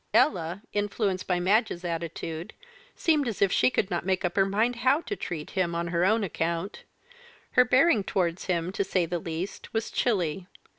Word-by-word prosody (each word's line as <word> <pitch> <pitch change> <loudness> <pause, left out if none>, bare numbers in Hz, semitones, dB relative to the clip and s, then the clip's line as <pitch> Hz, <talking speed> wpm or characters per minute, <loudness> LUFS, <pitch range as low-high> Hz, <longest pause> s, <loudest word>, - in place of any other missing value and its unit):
Ella, 175 - +2
influenced 205 -2 -1
by 180 -1 +1
Madge's 185 -1 +1
attitude, 165 +1 -4 0.4
seemed 305 -5 +2
as 225 - -3
if 195 -2 +3
she - - +4
could 205 -5 -1
not 175 - -1
make 185 0 0
up 175 - -2
her 195 -1 +3
mind 225 +5 +1
how 260 +6 +3
to 410 - -4
treat 160 - -5
him 180 -3 0
on 170 0 -2
her 170 0 +1
own 215 +4 +3
account; 170 +1 -3 0.7
her 250 - +6
bearing 255 -2 +4
towards 180 -2 -1
him, 175 -1 -1
to 200 - -1
say 185 -2 +1
the 175 +1 -2
least, 165 +4 -5
was 225 0 -1
chilly. 185 -6 0
190 Hz, 185 wpm, -27 LUFS, 170-220 Hz, 0.7 s, her